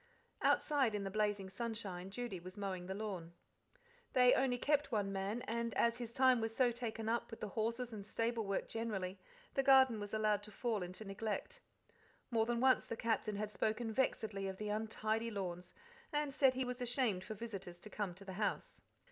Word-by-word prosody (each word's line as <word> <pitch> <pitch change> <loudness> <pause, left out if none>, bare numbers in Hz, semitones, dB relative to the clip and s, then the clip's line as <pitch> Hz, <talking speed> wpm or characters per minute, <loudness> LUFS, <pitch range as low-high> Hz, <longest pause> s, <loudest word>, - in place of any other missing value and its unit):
Outside 270 -8 +3
in 205 - -1
the 195 - -3
blazing 205 -2 +1
sunshine 195 -3 -4
Judy 220 -2 -4
was 185 +3 -9
mowing 190 -3 -3
the 190 - -3
lawn. 190 -6 -4 0.8
They 250 -1 +7
only 260 -2 +3
kept 290 +1 +2
one 205 -3 +1
man, 200 +5 -2
and, 230 0 -2
as 235 +1 +3
his 235 -2 -4
time 255 -1 +5
was 225 0 -2
so 250 -1 +4
taken 225 -2 -4
up 235 +1 0
with 225 - -8
the 215 - -3
horses 230 +3 -1
and 205 -2 -5
stable 230 +1 -1
work 195 - -1
generally, 200 -5 -3 0.3
the 270 - +3
garden 265 -4 +6
was 205 0 -5
allowed 215 -1 +2
to 210 +1 -11
fall 225 -1 -1
into 180 +4 -6
neglect. 205 +2 -3 0.7
More 225 -1 +3
than 240 -1 +1
once 260 0 +5
the 230 - -4
Captain 220 -2 0
had 210 +1 -2
spoken 220 +1 -1
vexedly 215 -5 0
of 190 0 -4
the 210 +1 -3
untidy 220 +1 -1
lawns, 180 -4 -4 0.4
and 295 -2 0
said 265 -2 +5
he 260 0 0
was 250 0 -4
ashamed 240 -6 +1
for 220 - -6
visitors 195 -5 -6
to 215 - -8
come 200 -4 -2
to 195 +2 -11
the 190 - -6
house. 210 - -1
220 Hz, 195 wpm, -37 LUFS, 200-240 Hz, 0.8 s, They